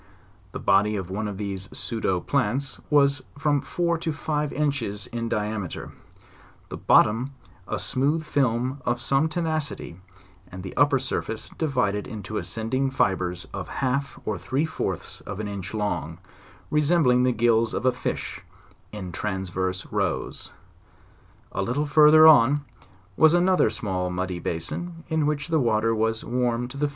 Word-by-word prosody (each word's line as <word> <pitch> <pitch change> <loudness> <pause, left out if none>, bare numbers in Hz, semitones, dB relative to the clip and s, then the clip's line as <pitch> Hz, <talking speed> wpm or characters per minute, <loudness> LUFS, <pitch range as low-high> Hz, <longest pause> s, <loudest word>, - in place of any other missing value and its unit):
The - - -6
body 100 +2 +3
of 95 -2 -4
one 105 +2 -2
of 100 -2 -5
these 95 -2 -5
pseudo 110 -6 -1
plants 135 0 -1
was 140 -2 +4 0.2
from 145 -1 +1
four 170 -1 -1
to 165 - -2
five 150 -1 -2
inches 130 -9 -1
in 115 -1 -4
diameter; 105 -4 -3 0.8
the - - -6
bottom 125 +6 +3 0.3
a 110 - -2
smooth 135 - 0
film 130 -1 0
of 120 0 0
some 135 +6 +2
tenacity 155 - -3 0.5
and 90 0 -8
the 95 - -7
upper 145 0 +4
surface 125 -3 -3
divided 125 -10 -1
mto 105 0 -5
ascending 130 +4 -1
fibres 90 -8 0
of - - -5
half 140 +1 -2
or 105 -4 -2
three 135 - 0
fourths 160 - -4
of 100 0 -5
an 105 - -3
inch 100 -3 -5
long, 105 -2 -2 0.5
resembling 150 -4 +4
the 125 0 +3
gills 115 -1 +2
of - - -2
a 130 - +5
fish, - - -4 0.5
in 95 -4 -6
transverse 95 -1 -2
rows. - - -2 1.0
A - - -2
little 125 +9 0
further 155 +1 +7
on 145 -1 +6 0.5
was 160 - +6
another 180 -5 +4
small 95 -4 -2
muddy 90 0 -3
basin, 165 - -4
in 160 -2 +1
which 150 +1 -1
the 160 -1 +3
water 115 -2 +2
was 110 0 0
warm 125 0 0
to 140 - -9
the. 145 +1 0
120 Hz, 150 wpm, -25 LUFS, 105-145 Hz, 1.0 s, further